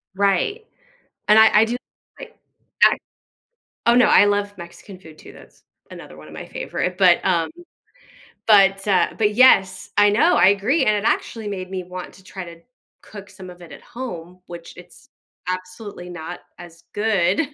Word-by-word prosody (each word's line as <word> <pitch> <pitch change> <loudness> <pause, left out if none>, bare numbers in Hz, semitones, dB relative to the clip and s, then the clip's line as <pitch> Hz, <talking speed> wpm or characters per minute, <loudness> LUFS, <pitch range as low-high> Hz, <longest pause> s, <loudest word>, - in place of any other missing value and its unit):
Right. 200 - 0 0.6
And 215 +1 +6
I 220 -1 +6
I - - +4
do 235 - -3 0.4
like 480 -2 -12 0.5
act - - +3 0.9
Oh, 235 +1 +4
no. 250 - +5
I - - +5
love 205 0 -1
Mexican 175 +2 -12
food 155 -4 -16
too. - - -15
That's - - -19 0.3
another 75 - -12
one 75 0 -14
of 75 - -14
my - - -8
favorite. 180 0 -5
But, 180 -3 +4
um 165 -1 +1 1.0
but, 195 -2 +4
uh, 195 -3 +2
but 210 -1 +1
yes, 195 -7 +3
I 205 0 +5
know. 320 +12 +3
I - - +5
agree. 210 +11 +1
And 215 - +2
it 205 - -4
actually 220 -3 -3
made 185 -2 -6
me 185 -1 -4
want 180 0 -9
to 190 - -18
try 190 -1 -8
to 170 -1 -13 0.4
cook 200 -2 -12
some 190 -2 -12
of 180 0 -15
it 170 - -13
at - - -13
home, 180 -8 -9
which 170 -1 -11
it's 180 +10 -16 0.4
absolutely 185 0 -7
not 175 +1 -8 0.2
as 170 -1 -14
good, 205 - 0
195 Hz, 175 wpm, -20 LUFS, 180-210 Hz, 1.0 s, And